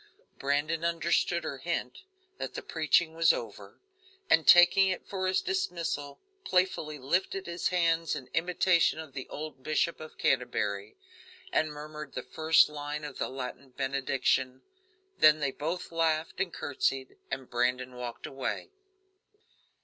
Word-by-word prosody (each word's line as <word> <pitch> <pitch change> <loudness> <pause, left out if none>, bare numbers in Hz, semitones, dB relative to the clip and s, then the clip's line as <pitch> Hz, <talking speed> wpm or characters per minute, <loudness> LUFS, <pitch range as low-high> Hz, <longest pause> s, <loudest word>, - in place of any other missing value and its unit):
Brandon 145 +4 0
understood 170 0 +1
her 140 -4 -5
hint 170 - -3 0.4
that - - -5
the - - -5
preaching 160 +1 +2
was 165 0 +5
over, 105 -3 -7 0.5
and 165 - +5
taking 175 +2 +8
it 185 -1 -2
for 190 -1 -2
his 185 - +1
dismissal, 170 - -2 0.2
playfully 180 -5 0
lifted 180 +7 -1
his 170 0 -2
hands 165 -2 +1
in 130 - -7
imitation 175 0 +2
of 160 -3 -8
the 135 -1 -7
old 155 -3 -7
Bishop 155 +4 0
of 155 0 -10
Canterbury, 105 -5 0 0.6
and 155 -1 +2
murmured 150 0 -8
the 130 - -4
first 160 +1 +4
line 150 0 -5
of 140 -3 -8
the - - -1
Latin 130 +1 -7
benediction. 130 -1 0 0.6
Then 155 0 +7
they 140 -3 -1
both 165 +7 -4
laughed 160 -1 0
and 190 -3 -1
courtesied, 135 -1 -2
and 130 -2 -4
Brandon 125 +1 -1
walked 120 -1 -6
away. 135 - -4
155 Hz, 140 wpm, -29 LUFS, 135-170 Hz, 0.6 s, taking